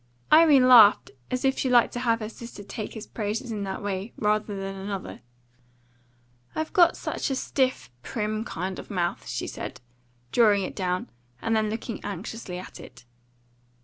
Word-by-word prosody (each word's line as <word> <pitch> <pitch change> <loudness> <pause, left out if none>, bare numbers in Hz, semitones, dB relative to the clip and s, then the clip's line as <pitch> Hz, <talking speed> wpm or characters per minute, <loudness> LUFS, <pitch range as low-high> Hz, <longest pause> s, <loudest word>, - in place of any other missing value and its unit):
Irene 305 -5 +7
laughed 225 -5 +7 0.2
as 255 +1 -2
if 265 0 +2
she 260 - 0
liked 240 -1 +4
to 245 - -3
have 230 -2 +1
her 215 - -4
sister 230 -2 -10
take 205 +3 -6
his 220 - -7
praises 225 +3 -4
in 210 -2 -3
that 190 0 -5
way 200 +2 -3
rather 210 0 0
than 195 0 -4
another. 195 0 -6 1.3
"I've 315 0 -3
got 345 -2 +5
such - - -3
a 270 - 0
stiff, 255 - -1
prim 215 - -3
kind 190 -3 -4
of - - -10
mouth," 175 -3 -2
she - - -3
said, - - -6 0.5
drawing 210 -4 +4
it - - -5
down, 180 - -2 0.3
and 225 - 0
then 215 -1 +1
looking 225 +1 -5
anxiously 200 0 -6
at 185 - -9
it. - - -13
215 Hz, 170 wpm, -26 LUFS, 195-240 Hz, 1.3 s, Irene